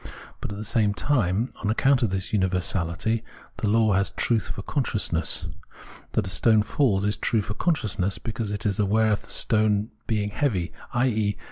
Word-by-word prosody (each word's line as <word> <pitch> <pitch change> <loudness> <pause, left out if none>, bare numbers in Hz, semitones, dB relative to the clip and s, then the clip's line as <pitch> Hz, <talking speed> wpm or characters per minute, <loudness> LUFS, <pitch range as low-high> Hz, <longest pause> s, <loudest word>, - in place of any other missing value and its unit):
But, - - -5
at 100 - -6
the 105 - -6
same 105 -2 +1
time, 110 +1 0
on 105 - -1
accoimt 135 +3 +3
of 115 - +2
this 95 +2 -3
universality, 95 +2 0 0.3
the 110 - -1
law 110 -1 +3
has 100 +1 +3
truth 115 -4 0
for 100 0 -6
consciousness. 105 - 0 0.7
That - - +1
a - - -3
stone 110 +2 +4
falls 105 -5 +1
is 105 0 0
true 110 -3 +1
for 105 - -4
con 170 +9 +1
sciousness, 100 -5 -2
because 110 -2 -4
it 105 +1 -3
is 100 -1 0
aware 110 +2 +3
of 105 - 0
the - - -15
stone 105 -1 +1 0.2
being 105 -2 0
heavy, 100 - -1 0.2
i.e. 110 -5 +1
105 Hz, 180 wpm, -25 LUFS, 100-115 Hz, 0.7 s, stone